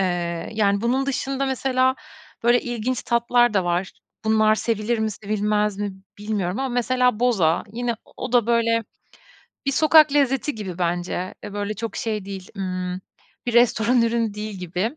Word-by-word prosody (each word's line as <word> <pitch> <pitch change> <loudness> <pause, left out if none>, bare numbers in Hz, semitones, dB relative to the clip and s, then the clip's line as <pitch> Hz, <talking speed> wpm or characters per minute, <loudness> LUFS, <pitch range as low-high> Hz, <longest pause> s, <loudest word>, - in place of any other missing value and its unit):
Eee, 175 -2 -2
yani, 200 -2 +2
bunun 260 +4 +1
dışında 275 0 -1
mesela, 260 0 +1 0.5
böyle, 240 +1 +4
ilginç 240 +1 -2
tatlar 240 -1 +2
da 190 - +2
var. 175 +2 -1 0.3
Bunlar 215 0 +4
sevilir 225 +1 -1
mi, 220 0 0
sevilmez 210 0 -1
mi 205 -1 -2 0.3
bilmiyorum 205 -1 -2
ama 270 0 -1
mesela 250 -1 +1
boza. 185 -10 +2
Yine 240 0 -1
o - - -22
o 250 0 -5
da, 240 -3 +4
böyle, 230 -1 +2 0.8
bir 275 - +2
sokak 310 -1 +6
lezzeti 275 0 +2
gibi 190 -5 -6
bence. 175 +1 -2
E, 205 - -7
böyle 205 +1 -3
çok 230 0 -5
şey 215 -3 -2
değil, 195 -2 -7
ımm, 185 -1 -3 0.5
bir 240 - 0
restoran 240 0 +4
ürünü 230 -2 0
değil 210 0 -5
gibi. 185 - -3
220 Hz, 160 wpm, -23 LUFS, 200-245 Hz, 0.8 s, sokak